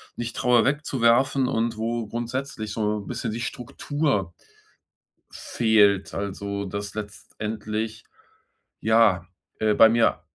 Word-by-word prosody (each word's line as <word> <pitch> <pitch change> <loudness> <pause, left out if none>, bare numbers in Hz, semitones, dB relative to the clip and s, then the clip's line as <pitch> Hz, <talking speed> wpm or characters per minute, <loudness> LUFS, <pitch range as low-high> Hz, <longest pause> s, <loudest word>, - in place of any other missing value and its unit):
nicht 120 0 -5
traue 125 -2 +3
wegzuwerfen, 135 -2 +2
und 115 -2 0
wo 115 0 -2
grundsätzlich 120 -1 -4
so 105 -1 -1
bisschen 110 +3 -4
die 115 +2 -4
Struktur 125 - -2 1.0
fehlt. 105 -4 +2
Also, 100 0 -4
dass 100 +1 -5
letztendlich 110 +1 -5 0.8
ja, 110 -6 +3 0.3
äh, 110 -1 +2
bei 110 +1 +7
mir 115 -4 +2
110 Hz, 105 wpm, -24 LUFS, 105-120 Hz, 1.0 s, bei